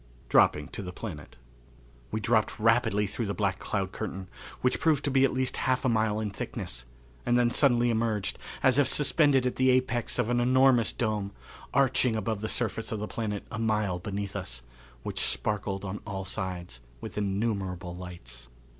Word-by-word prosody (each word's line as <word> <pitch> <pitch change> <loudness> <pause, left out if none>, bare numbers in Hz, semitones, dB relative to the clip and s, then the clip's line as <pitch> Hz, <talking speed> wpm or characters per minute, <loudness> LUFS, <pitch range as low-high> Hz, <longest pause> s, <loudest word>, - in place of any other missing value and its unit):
Dropping 75 -1 +4
to - - -6
the 90 -2 -6
Planet. 90 -6 -8 0.7
We 110 - -2
dropped 110 0 +1
rapidly 115 -2 +3
through 105 +3 -3
the 100 - -2
black 100 -3 0
cloud 95 -2 -2
curtain, 95 -3 -5 0.3
which 125 0 +1
proved 155 -3 +2
to 140 - +1
be 135 0 +4
at 135 - +4
least 130 0 -1
half 130 0 0
a - - +4
mile 110 -2 +1
in 105 -2 -2
thickness, 60 - -5 0.4
and 120 - +2
then 120 -1 +3
suddenly 120 -4 +4
emerged, 110 -3 0 0.2
as 130 +1 +5
if 145 - +4
suspended 145 -3 +3
at 125 - -1
the 130 0 +4
apex 125 -2 +1
of 120 -1 +1
an 120 - +2
enormous 130 -1 +4
dome, 105 -4 -2 0.4
arching 130 -3 +3
above 110 -1 -2
the 110 - -2
surface 115 -1 -2
of 110 - -1
the 105 +1 -4
planet 105 -3 -3
a 115 - -4
mile 105 -5 0
beneath 100 +1 -4
us, 90 -11 -5 0.4
which - - -3
sparkled 95 - -1
on 100 +2 -4
all 95 -1 -4
sides 90 -8 -4 0.2
with - - -8
innumerable 95 -3 -2
lights. 65 -10 -9
110 Hz, 180 wpm, -28 LUFS, 95-120 Hz, 0.7 s, as